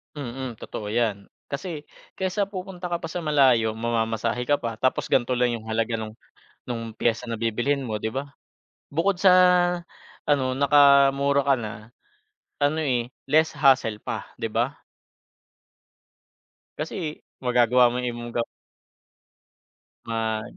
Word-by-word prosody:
Mm, 130 -3 -5
totoo 105 0 -7
yan, 105 -3 -1 0.2
kasi 155 +1 -5 0.3
kesa 190 +1 -1
pupunta 185 -2 -6
ka 170 -1 -3
pa 165 - -5
sa 175 - -3
malayo, 130 -8 +3
mamamasahe 115 +1 -1
ka 145 - +4
pa, 115 -4 -5
tapos 130 - 0
ganito 125 0 +2
lang 125 0 +2
yung 110 - -14
halaga 115 +1 -1
nung 110 0 -7 0.5
nung 115 -2 -4
piyesa 115 +2 0
na 115 -2 -5
bibilhin 120 +5 0
mo 110 -5 -3
'di 110 +1 -3
ba? 140 +2 -4 0.6
Bukod 175 +5 +1
sa 185 0 +5 1.0
ano 130 -3 +2
nakamura 140 0 +5
ka 140 0 +3
na, 110 -1 -7 0.7
ano 155 +2 +1
eh, 120 -4 0 0.2
less 155 0 +3
hassle 130 -7 +3
pa - - -4
'di 115 -1 -4
ba? 120 +6 0 2.0
Kasi 155 -5 -4 0.2
magagawa 125 0 +4
mo 125 - -3
yung 125 - 0
ibang 120 0 -7 1.7
Ma 110 -1 -2
125 Hz, 130 wpm, -25 LUFS, 115-145 Hz, 2.0 s, sa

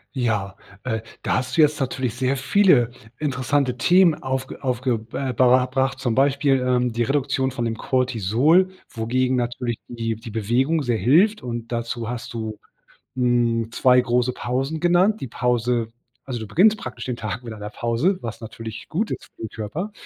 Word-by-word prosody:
Ja, 105 -6 -1 0.3
äh, 110 -3 -1 0.2
da - - 0
hast 130 0 -3
du 160 - +5
jetzt 150 0 +3
natürlich 130 -3 -2
sehr 130 +2 0
viele 135 - +4 0.3
interessante 130 -2 0
Themen 175 +7 +5
aufge 130 0 -4
aufge 125 -3 -1
äh, 135 -2 -2
ber 125 +1 +5
erbracht, 130 +1 0
zum 120 -4 0
Beispiel, 135 0 +3
ähm, 125 -1 +1
die 115 +1 0
Reduktion 135 0 0
von 120 -1 -3
dem 115 -1 -2
Cortisol, 130 - +2 0.2
wogegen 125 +3 0
natürlich 120 -1 -2
die 115 -2 -3
die 115 0 -9
Bewegung 125 +9 +1
sehr 120 -3 0
hilft 175 - +4
und 120 -1 -5
dazu 115 -1 -3
hast 120 0 -6
du 110 -2 -5 0.6
hm, 120 -2 +1
2 125 +1 +4
große 125 0 +1
Pausen 135 +6 -2
genannt. 180 +5 +3
Die - - -4
Pause 120 -1 0 0.4
also 125 -3 -3
du 110 - -6
beginnst 210 - +4
praktisch - - -7
den 125 -2 -3
Tag 110 +1 -5
mit 115 -2 -7
einer 105 -1 -7
Pause, 120 - 0
was 115 0 -6
natürlich 110 0 -8
gut 210 +7 -1
ist - - -5
für - - -14
den 110 - -4
Körper 150 - -5
125 Hz, 175 wpm, -23 LUFS, 115-135 Hz, 0.6 s, du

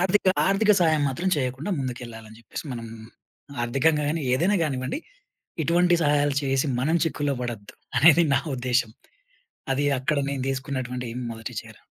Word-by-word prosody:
ఆర్థిక 190 +2 +2 0.2
ఆర్థిక 210 +2 +4
సహాయం 155 -3 +3
మాత్రం 170 +8 -2
చేయకుండా, 130 +7 -2
ముందుకు 130 -2 -3
వెళ్ళాలి 115 -1 -10
అని 110 - -14
చెప్పేసి 115 - -7
మనం, 115 -1 -6 0.8
ఆర్థికంగా 150 +5 +2
గాని, 160 0 -1
ఏదైనా 190 +9 +2
గానివ్వండి, 130 - -2 0.7
ఇటువంటి 175 +2 +3
సహాయాలు 145 -1 +2
చేసి 135 +1 +1
మనం 160 +6 +2
చిక్కుల్లో 145 -2 -1
పడొద్దు, 115 -4 -6 0.2
అనేది 165 +4 +6
నా 130 - +4 0.2
ఉద్దేశ్యం. 125 -3 0 0.8
అది 145 +2 0
అక్కడ 140 +3 0
నేను 135 -2 -3
తీసుకున్నటువంటి 130 -2 -3 0.2
మొదటి 115 -1 -7
చర్య. - - -15
135 Hz, 145 wpm, -25 LUFS, 125-160 Hz, 0.8 s, అనేది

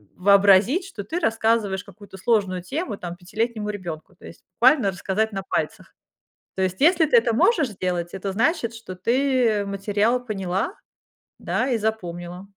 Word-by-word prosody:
вообразить, 200 - +4
что 210 - -7
ты 325 - -3
рассказываешь 220 - +1
какую-то 200 0 -14
сложную 195 -4 +1
тему, 290 - -4
там, 175 -2 -6
пятилетнему 215 +3 -3
ребёнку, 175 -4 -7
то - - -16
есть - - -12
буквально 255 -3 +4
рассказать 205 +3 -2
на 195 -1 -4
пальцах. - - -3 0.6
То 190 - -2
есть, 185 0 -2
если 330 +1 +5
ты 250 - +4
это 230 -1 +3
можешь 315 - +3
сделать, 180 -2 -3
это 195 0 -4
значит, 230 - 0
что 225 -5 -9
ты 235 0 +1
материал 205 +5 0
поняла, 195 - -2 0.6
да, 260 +1 -1
и 235 - +1
запомнила. 180 -4 -4
205 Hz, 155 wpm, -23 LUFS, 190-235 Hz, 0.6 s, если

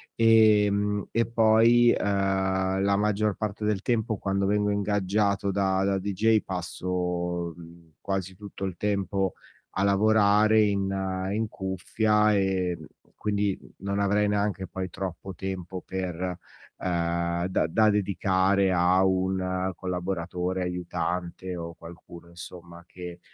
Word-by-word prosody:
ehm, 105 -2 +4
e 115 0 +1
poi, 115 +1 +5
uhm, 95 -1 0
la 100 0 +2
maggior 105 0 +1
parte 105 -1 -4
del 105 -2 0
tempo 110 -3 0
quando 100 0 -1
vengo 105 0 +1
ingaggiato 100 0 0
da 95 -1 +1
da 95 0 +1
deejay 105 +3 +2
passo, 90 -1 -3
mhmm, 85 -1 -15
quasi 95 -1 -3
tutto 100 -1 -9
il 95 -3 -4
tempo 100 -2 -1 0.4
a 95 - +1
lavorare 105 +1 +4
in 100 -2 0 0.4
in 110 +1 -1
cuffia 105 +3 +1
e, 95 -2 0
mhmm, 80 - -10 0.4
quindi 100 -2 0 0.3
non 100 0 -2
avrei 105 +1 +2
neanche 100 -2 -1
poi 95 0 -5
troppo 95 0 -6
tempo 95 0 -5
per 95 -2 -4 0.6
ehm, 85 -1 -1
da 95 - 0
da 110 +6 +3
dedicare 95 -1 +2
a 90 +2 +3
un 95 0 0
collaboratore, 90 0 -3
aiutante 90 0 -3
o 85 -1 -6
qualcuno 85 0 -13
insomma 85 0 -11
che, 90 -1 -9
95 Hz, 125 wpm, -26 LUFS, 90-105 Hz, 0.6 s, poi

